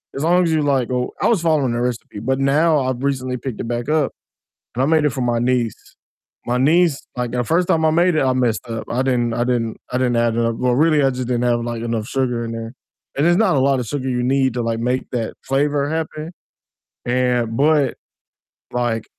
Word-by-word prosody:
as 140 - -3
long 180 +2 +4
as 165 - +1
you 155 - +2
like, 135 -4 +1
oh 125 0 -1
I - - +3
was 225 -6 +3
following 150 -7 +1
a 120 - -1
recipe, 120 -4 -4
but 130 +5 -1
now 150 +3 +3
I've 130 -1 -2
recently 130 -2 -1
picked 125 -2 -5
it - - -5
back 120 +3 -3
up 155 -3 +1 0.6
and 125 - 0
I - - +3
made 155 -1 +3
it 150 - +2
for 130 - -5
my 120 -1 +1
niece, 120 -2 -1 0.5
my 120 +1 0
niece, 155 +2 +2
like 125 -1 -2
the 125 0 -1
first 170 +7 +1
time 160 - +2
I 155 - +4
made 170 +1 +3
it, - - +2
I 130 - +2
messed 125 -4 0
up, 115 -1 -4
I 125 - 0
didn't 120 -3 0
I 120 - 0
didn't 115 -3 -1 0.2
I 125 - 0
didn't 125 -2 +1
add 115 -1 +1
enough 115 0 0
Well, 125 -1 +2
really, 150 0 +3
I 135 - +4
just 125 -1 -4
didn't 125 -1 0
have 120 -1 +2
like 120 -1 -4
enough 115 -1 -2
sugar 125 -4 -1
in 115 - -5
there, 115 0 -6 0.5
and 150 - +3
it's 175 - +4
not 210 -8 +3
a - - +3
lot 135 -1 +2
of 115 - -6
sugar 130 0 -3
you 125 -1 -1
need 130 0 +2
to 120 - -1
like 115 0 -1
make 125 +2 -1
that 115 -3 -2
flavor 140 +1 +1
happen, 160 0 -4 0.8
and 120 -2 0
but, 145 -3 +3 0.8
like 120 -2 -1
130 Hz, 235 wpm, -20 LUFS, 120-145 Hz, 0.8 s, long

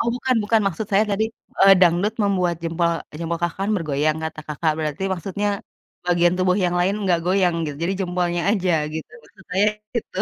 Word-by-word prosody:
Oh, - - +1
bukan 255 0 0
bukan, 225 +1 +3
maksud 195 +3 -2
saya 205 +2 +5
tadi, 215 +2 +1 0.4
eee, 195 0 +8
dangdut 180 +5 +3
membuat 180 -4 +1
jempol 170 +1 +1 0.3
jempol 170 0 -2
Kakak 170 +1 -1
kan 200 +2 0
bergoyang, 155 -2 0
kata 160 0 -5
Kakak. 155 +1 0
Berarti 155 +3 -3
maksudnya, 195 +3 -2 0.6
bagian 175 0 +3
tubuh 185 0 +2
yang 175 0 +1
lain 185 +3 +2
nggak 180 -3 +3
goyang, 185 -2 +2
gitu? 145 -2 -5
Jadi 180 +3 0
jempolnya, 175 -1 -1
aja 190 -4 +1 0.2
gitu. 160 - -6
Maksudnya 190 -1 -8 0.4
gitu. 225 -5 -4
180 Hz, 180 wpm, -22 LUFS, 170-195 Hz, 0.6 s, eee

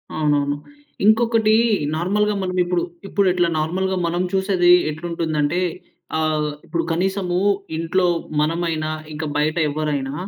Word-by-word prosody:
అవునవును. 145 -2 +1 0.5
ఇంకొకటీ 220 0 +4 0.4
నార్మల్‌గా 205 +5 +1
మనం 185 0 -3
ఇప్పుడు, 175 -1 0 0.2
ఇప్పుడు 200 0 +1
ఎట్లా 175 -1 +2
నార్మల్‌గా 185 +4 -1
మనం 175 +1 -1
చూసేది 190 -2 +3 0.2
ఎట్లుంటుందంటే 160 0 -1 0.6
ఆహ్, 155 -1 0
ఇప్పుడు 170 -1 -2
కనీసము 180 +1 0 0.4
ఇంట్లో 165 +3 +1 0.4
మనమైనా 160 0 -1 0.2
ఇంక, 155 +1 -5
బయట 155 +1 +1
ఎవ్వరైనా 145 -2 -2
170 Hz, 110 wpm, -21 LUFS, 155-190 Hz, 0.6 s, ఇంకొకటీ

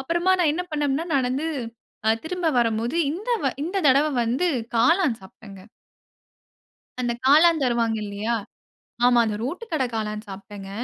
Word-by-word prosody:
அப்புறமா 345 +7 +1
நான் 340 -4 +3
என்ன 355 +4 -2
பண்ணேன்னா, 295 +1 -1
நடந்து 265 +3 0 0.8
திரும்ப 360 +1 -3
வரும்போது, 230 +4 0 0.2
இந்த 405 +8 -7 0.2
வ - - +3 0.2
இந்த 365 +4 -4
தடவ 280 +3 +5 0.2
வந்து 250 +10 0 0.3
காளான் 290 - +3
சாப்பிட்டேன்ங்க. 190 +1 -14 1.3
அந்த 240 -1 0
காளான் 315 +2 +5
தருவாங்க. 235 -2 +1
இல்லையா. 205 +3 -2 0.7
ஆமா. 245 -1 +5
அந்த 210 - -2
ரோட்டு 340 - -4
கடை 280 -5 +1
காளான் 215 0 -4
சாப்பிட்டேங்க. 195 0 -9
255 Hz, 135 wpm, -24 LUFS, 220-320 Hz, 1.3 s, தடவ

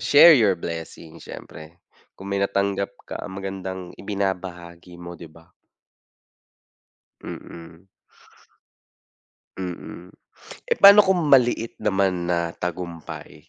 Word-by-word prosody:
share 145 +4 +8
your 105 -5 +3
blessings, 80 -1 -8
siyempre, 80 +3 -11 0.4
kung 100 +1 -9
may 100 - 0
natanggap 100 0 0 0.2
ka - - -6
ang 95 - -9
magandang 95 -1 -5 0.2
ibinabahagi 90 -3 -5
mo, 85 0 -9
'di 85 - -10
ba? 80 +2 -19 1.7
Mm. 85 +2 -11 1.7
Mm. 90 -1 -7 0.6
Eh, - - +2
paano 200 +1 +10
kung 185 -4 +1
maliit 120 -3 +3
naman 95 -4 0
na 85 -1 0
tagumpay? 85 -2 -7
95 Hz, 100 wpm, -23 LUFS, 85-100 Hz, 1.7 s, paano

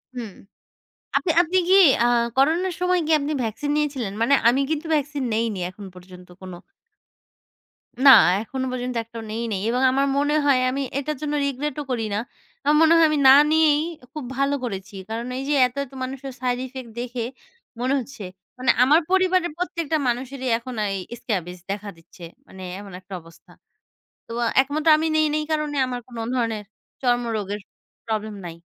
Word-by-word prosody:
হুম। 230 -5 -6 0.8
আপনি 350 - 0
আপনি 355 +3 0
কি 380 - +5 0.3
আ - - +4 0.3
করোনার 335 +6 +2
সময় 360 0 +2
কী 320 - +1
আপনি 285 +2 -2
ভ্যাকসিন 225 +6 -3
নিয়েছিলেন? 275 -9 -1
মানে 280 +4 +4
আমি 260 +3 +3
কিন্তু 315 +1 -2
ভ্যাকসিন 290 -1 -1
নেইনি 220 -4 -1
এখন 195 +1 -11
পর্যন্ত 180 0 -14
কোনো 185 -2 -8 1.5
না 270 - +11 0.3
এখনো 260 +3 -4
পর্যন্ত 250 0 -4
একটাও 230 0 -9
নেই 230 +2 -3
নাই। 195 - -1
এবং 250 +2 0
আমার 275 +1 +2
মনে 290 +1 +1
হয় 275 -3 +4
আমি 275 +2 -2 0.2
এটার 295 0 -3
জন্য 300 -1 -2
রিগ্রেট 280 +1 -3
ও - - -4
করি 225 -3 -1
না। 205 - 0 0.4
আমার 295 +2 +3
মনে 325 +1 +6
হয় 330 - +6
আমি 305 -1 0
না 265 - +10 0.2
নিয়েই 310 -2 +4 0.3
খুব 300 -3 -6
ভালো 275 +1 +1
করেছি। 200 -4 -5
কারণ 230 +2 -4
এই 270 - -4
যে - - +2
এত, 250 - -17
এত 270 - -20
মানুষের 270 +1 -6
সাইড 250 -1 0
ইফেক্ট 255 -2 -9
দেখে 245 -1 -4 0.6
মনে 255 +2 0
হচ্ছে। 245 -4 -8 0.3
মানে 255 +1 +3
আমার 295 +6 +5
পরিবারের 370 -2 +2
প্রত্যেকটা 335 -3 -2
মানুষেরই 255 +2 -3
এখন 245 +2 -8 0.2
এই - - -2 0.2
স্ক্রাবজ 180 -7 -3
দেখা 205 +1 -5
দিচ্ছে, 165 +2 -17 0.2
মানে 190 0 -11 0.2
এমন 200 -1 -10
একটা 190 +1 -13
অবস্থা। 165 0 -19 0.8
তো - - -10 0.3
একমত 295 +4 -3
আমি 320 - 0
নেই, 310 0 +4
নেই 305 - +1
এই - - -5
কারণে 305 -2 -1
আমার 250 -1 -4
কোন 240 -2 -11 0.2
ধরনের 225 -3 -1 0.4
চর্মরোগের 230 -5 -1 0.5
প্রবলেম 215 -1 -3
নাই। 165 -1 -8
255 Hz, 175 wpm, -23 LUFS, 225-295 Hz, 1.5 s, না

